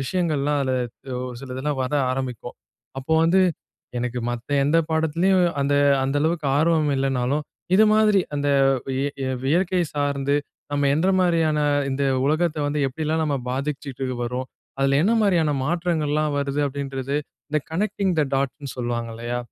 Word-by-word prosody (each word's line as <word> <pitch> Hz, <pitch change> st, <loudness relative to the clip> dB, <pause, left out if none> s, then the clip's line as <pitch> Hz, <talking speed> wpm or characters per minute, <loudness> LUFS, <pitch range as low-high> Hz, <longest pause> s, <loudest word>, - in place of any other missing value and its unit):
விஷயங்கள்லாம், 150 Hz, -1 st, 0 dB
அதில 130 Hz, -1 st, 0 dB, 0.5 s
ஒரு 125 Hz, -, -8 dB
சில 135 Hz, -2 st, -8 dB
இதெல்லாம் 145 Hz, +1 st, -2 dB
வர 130 Hz, +3 st, -3 dB, 0.2 s
ஆரம்பிக்கும். 130 Hz, -3 st, -4 dB, 0.4 s
அப்போ 135 Hz, +4 st, -3 dB
வந்து, 175 Hz, +3 st, +4 dB, 0.6 s
எனக்கு 125 Hz, 0 st, -2 dB
மத்த 120 Hz, +2 st, -6 dB
எந்த 155 Hz, +4 st, +3 dB
பாடத்துலயும் 170 Hz, +4 st, +2 dB, 0.2 s
அந்த 145 Hz, +1 st, +1 dB, 0.3 s
அந்த 135 Hz, +2 st, -1 dB
அளவுக்கு 160 Hz, -2 st, 0 dB
ஆர்வம் 155 Hz, -1 st, +2 dB
இல்லைன்னாலும், 135 Hz, +2 st, 0 dB, 0.3 s
இது 215 Hz, -, +7 dB
மாதிரி 215 Hz, -2 st, +4 dB
அந்த 145 Hz, 0 st, 0 dB, 0.4 s
வ் 130 Hz, -, -2 dB, 0.3 s
இ -, -, -2 dB, 0.2 s
இயற்கை 175 Hz, +5 st, +2 dB
சார்ந்து 140 Hz, -1 st, 0 dB, 0.4 s
நம்ம 145 Hz, -1 st, +2 dB
எந்த 160 Hz, +5 st, +1 dB
மாதிரியான, 165 Hz, -4 st, +2 dB, 0.3 s
இந்த 140 Hz, +1 st, -1 dB, 0.2 s
உலகத்த 155 Hz, +2 st, +1 dB
வந்து 145 Hz, +1 st, -1 dB
எப்படியெல்லாம் 155 Hz, +4 st, -1 dB
நம்ம 145 Hz, -2 st, 0 dB
பாதிச்சிட்டு 135 Hz, 0 st, -3 dB, 0.2 s
வரோம்? 125 Hz, +2 st, -3 dB, 0.3 s
அதில 135 Hz, 0 st, +3 dB
என்ன 215 Hz, +5 st, +3 dB
மாரியான 175 Hz, -7 st, +3 dB
மாற்றங்கள்லாம் 155 Hz, -2 st, 0 dB
வருது? 140 Hz, +1 st, -1 dB
அப்படின்றது. 140 Hz, 0 st, -3 dB, 0.3 s
இந்த 150 Hz, 0 st, +1 dB
கனெக்டிங் 195 Hz, +2 st, 0 dB
த -, -, +4 dB
டாட்ன்னு 140 Hz, +1 st, -2 dB
சொல்லுவாங்க 120 Hz, -1 st, -3 dB
இல்லையா, 120 Hz, +1 st, -3 dB
145 Hz, 145 wpm, -23 LUFS, 135-160 Hz, 0.6 s, இது